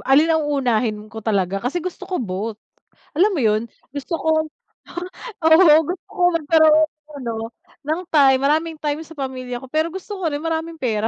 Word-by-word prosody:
alin 295 Hz, +5 st, +5 dB
ang 315 Hz, -1 st, +1 dB
unahin 245 Hz, -6 st, +1 dB
ko 220 Hz, +1 st, -9 dB
talaga, 195 Hz, -2 st, 0 dB
kasi 275 Hz, +9 st, -1 dB
gusto 360 Hz, +1 st, -6 dB
ko 365 Hz, -, -1 dB
both. 210 Hz, 0 st, -4 dB, 0.6 s
Alam 370 Hz, +8 st, +4 dB
mo -, -, -1 dB
yun? 215 Hz, 0 st, +3 dB, 0.3 s
Gusto 290 Hz, +4 st, -3 dB
ko -, -, -5 dB, 1.2 s
o, -, -, +4 dB
oo, 320 Hz, -1 st, +7 dB
gusto 360 Hz, +3 st, -5 dB
ko 360 Hz, -, -6 dB
magkaroon 315 Hz, -1 st, +4 dB
ng 305 Hz, -1 st, -24 dB
ano, 235 Hz, -2 st, -3 dB, 0.5 s
ng 315 Hz, +4 st, -1 dB
time, 270 Hz, -4 st, +5 dB
maraming 315 Hz, +3 st, +1 dB
time 300 Hz, +1 st, -1 dB
sa 325 Hz, -, -13 dB
pamilya 255 Hz, -2 st, -5 dB
ko. 265 Hz, -, -10 dB
Pero 315 Hz, +4 st, 0 dB
gusto 385 Hz, +2 st, -6 dB
ko -, -, -2 dB
rin 290 Hz, -, -3 dB
maraming 325 Hz, 0 st, -3 dB
pera 225 Hz, -3 st, 0 dB
295 Hz, 185 wpm, -21 LUFS, 245-320 Hz, 1.2 s, oo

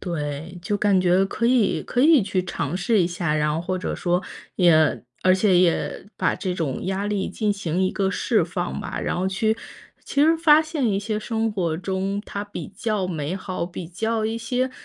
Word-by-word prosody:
对， 165 Hz, 0 st, -4 dB
就 205 Hz, +1 st, -1 dB
感 200 Hz, -2 st, +3 dB
觉 185 Hz, +1 st, +3 dB
可 230 Hz, +4 st, -1 dB
以 240 Hz, -5 st, +2 dB
可 245 Hz, -, -1 dB
以 295 Hz, -3 st, +6 dB
去 185 Hz, -1 st, -1 dB
尝 145 Hz, -3 st, -3 dB
试 195 Hz, +2 st, +2 dB
一 170 Hz, -, +2 dB
下， 175 Hz, -3 st, -1 dB
然 150 Hz, 0 st, +1 dB
后 165 Hz, -, -1 dB
或 185 Hz, +2 st, -2 dB
者 -, -, -3 dB
说， 180 Hz, +1 st, 0 dB, 0.3 s
也 160 Hz, -7 st, +4 dB, 0.2 s
而 185 Hz, 0 st, +5 dB
且 190 Hz, -2 st, +3 dB
也 180 Hz, +2 st, +1 dB
把 -, -, +1 dB
这 185 Hz, -3 st, -3 dB
种 150 Hz, -7 st, -3 dB
压 195 Hz, +2 st, -1 dB
力 205 Hz, -2 st, -1 dB
进 210 Hz, +1 st, 0 dB
行 185 Hz, -2 st, -2 dB
一 185 Hz, -, +2 dB
个 195 Hz, -1 st, 0 dB
释 -, -, +1 dB
放 -, -, -3 dB
吧。 -, -, -5 dB
然 -, -, -1 dB
后 190 Hz, +1 st, 0 dB
去 220 Hz, +3 st, +1 dB, 0.5 s
其 280 Hz, -, +1 dB
实 325 Hz, +2 st, +5 dB
发 315 Hz, -1 st, +6 dB
现 310 Hz, -5 st, -2 dB
一 195 Hz, -, +1 dB
些 210 Hz, +1 st, -2 dB
生 225 Hz, 0 st, -1 dB
活 170 Hz, -6 st, -1 dB
中， 195 Hz, +3 st, -2 dB
它 200 Hz, -, -5 dB
比 205 Hz, -, -7 dB
较 200 Hz, -1 st, -2 dB
美 165 Hz, 0 st, -3 dB
好， 185 Hz, -2 st, -4 dB
比 175 Hz, -1 st, -7 dB
较 220 Hz, +5 st, -2 dB
一 225 Hz, +1 st, -1 dB
些 250 Hz, +3 st, -1 dB
190 Hz, 220 characters per minute, -23 LUFS, 175-220 Hz, 0.5 s, 以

